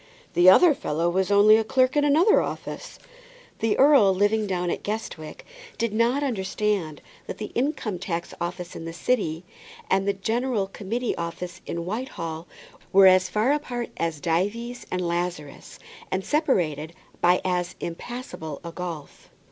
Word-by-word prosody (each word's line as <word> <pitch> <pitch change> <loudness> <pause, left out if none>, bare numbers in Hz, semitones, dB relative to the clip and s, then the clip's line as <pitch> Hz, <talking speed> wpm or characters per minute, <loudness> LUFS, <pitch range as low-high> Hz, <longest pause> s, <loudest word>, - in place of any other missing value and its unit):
"The 175 +1 +7
other 320 - +7
fellow 170 - -1
was 190 +1 0
only 205 +2 +6
a 225 - +1
clerk 255 +4 +2
in 295 - +3
another 315 +9 +4
office." - - -6 0.6
The 225 -1 +1
earl 265 -9 +6
living 205 +2 +2
down 180 -2 -1
at - - -3
Guestwick 205 -7 -6 0.3
did 230 -2 -1
not 240 +6 +2
understand 195 - -2 0.2
that - - -6
the 210 - -6
Income 245 - -2
tax 170 -2 -4
Office 175 0 -5
in 165 - -7
the 165 - -6
city, 170 -4 -1 0.5
and 195 +1 +2
the 200 - +2
General 225 +2 -1
Committee 220 +5 -3
Office 170 +1 -6
at - - -4
Whitehall, 170 -4 -5 0.4
were 195 0 +7
as 185 0 +6
far 215 +6 +1
apart 250 -5 -3
as 165 -2 -2
Dives 205 +10 -2
and 180 -1 -2
Lazarus, 170 -4 -4 0.3
and 190 0 -2
separated 170 - 0 0.3
by 180 +1 +4
as 180 -1 -1
impassable 170 - -6
a 170 - -6
gulf. 165 -4 -8
190 Hz, 150 wpm, -25 LUFS, 170-235 Hz, 0.6 s, The